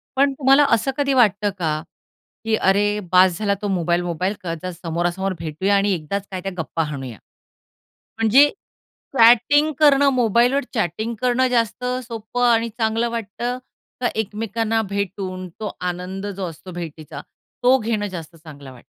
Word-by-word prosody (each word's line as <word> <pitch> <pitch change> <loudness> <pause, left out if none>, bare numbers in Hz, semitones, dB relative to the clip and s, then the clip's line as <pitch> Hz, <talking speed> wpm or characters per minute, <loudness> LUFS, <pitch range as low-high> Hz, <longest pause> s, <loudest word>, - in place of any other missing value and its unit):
पण 275 +1 +3
तुम्हाला 275 +1 +4
असं 230 +4 +2
कधी 280 -1 +1
वाटतं 210 -5 +3
का, 155 -3 -1 0.6
की 220 0 +2
"अरे! 205 +1 +2
बास 185 -1 +5
झाला 205 -2 +1
तो 205 - -2
मोबाईल-मोबाईल, 175 0 0
का 170 -2 -3
ज 185 - -3
समोरासमोर 175 +3 -2
भेटूया 165 +5 0
आणि 200 +1 +2
एकदाच 190 +4 -4
काय 185 -1 -4
त्या 195 +1 -4
गप्पा 165 0 -2
हाणूया." 135 -6 -6 1.0
म्हणजे 235 +6 +6 0.7
चॅटिंग 245 +7 +5
करणं 285 -2 +5
मोबाईलवर 245 +3 +2
चॅटिंग 220 +2 -2
करणं 255 +1 +2
जास्त 235 -1 0 0.2
सोपं 230 +1 -2
आणि 230 0 +2
चांगलं 225 +1 -1
वाटतं, 235 +2 -4 0.4
का 245 - +2
एकमेकांना 220 +1 -1
भेटून 190 -2 -4
तो 210 -3 -4
आनंद 180 +2 -4
जो 195 -1 -4
असतो 165 +3 -11
भेटीचा 160 -4 -7 0.4
तो 255 +2 +6
घेणं 215 -2 -1
जास्त 170 -3 -8
चांगलं 145 -4 -12
वाटतं? 125 -2 -16
205 Hz, 145 wpm, -21 LUFS, 175-235 Hz, 1.0 s, म्हणजे